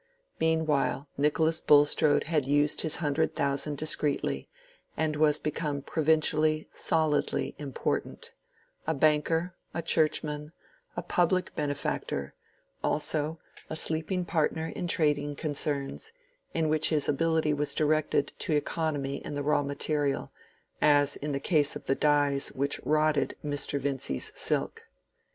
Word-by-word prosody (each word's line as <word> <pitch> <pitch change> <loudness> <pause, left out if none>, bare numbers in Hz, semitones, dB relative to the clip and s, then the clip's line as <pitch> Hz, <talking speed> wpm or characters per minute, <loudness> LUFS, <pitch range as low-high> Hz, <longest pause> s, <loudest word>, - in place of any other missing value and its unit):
Meanwhile 155 -3 +1
Nicholas 160 +3 +1
Bulstrode 145 0 +4
had 155 -3 0
used 145 +1 +2
his 160 -2 0
hundred 155 0 0
thousand 140 0 0
discreetly, 150 -1 -1 0.5
and 155 -1 0
was 150 0 +3
become 150 -2 -3
provincially, 155 0 +2
solidly 155 -2 0
important—a 145 +3 -5
banker, 155 +4 +2 0.2
a 165 - -2
Churchman, 150 -1 0 0.4
a 175 - -2
public 180 +1 +1
benefactor; 145 - -3 0.5
also 155 +1 +1 0.3
a - - -4
sleeping 160 +3 -1
partner 160 -1 -1
in 175 - -3
trading 145 -3 +1
concerns, 145 - -2 0.4
in 165 -1 0
which 155 0 +2
his 150 -3 +2
ability 160 +1 +1
was 150 0 -2
directed 155 -1 +1
to 160 - -1
economy 145 -2 -1
in - - -6
the 145 - -2
raw 150 0 +2
material, 145 0 -1 0.5
as 145 -1 +4
in 150 +1 -4
the 140 - -1
case 150 -2 +2
of - - -8
the - - +2
dyes 145 -1 +2
which 140 +2 -1
rotted 155 0 +1
Mr. 145 -1 0
Vincy's 135 - -2
silk. - - -1
150 Hz, 125 wpm, -28 LUFS, 145-160 Hz, 0.5 s, Bulstrode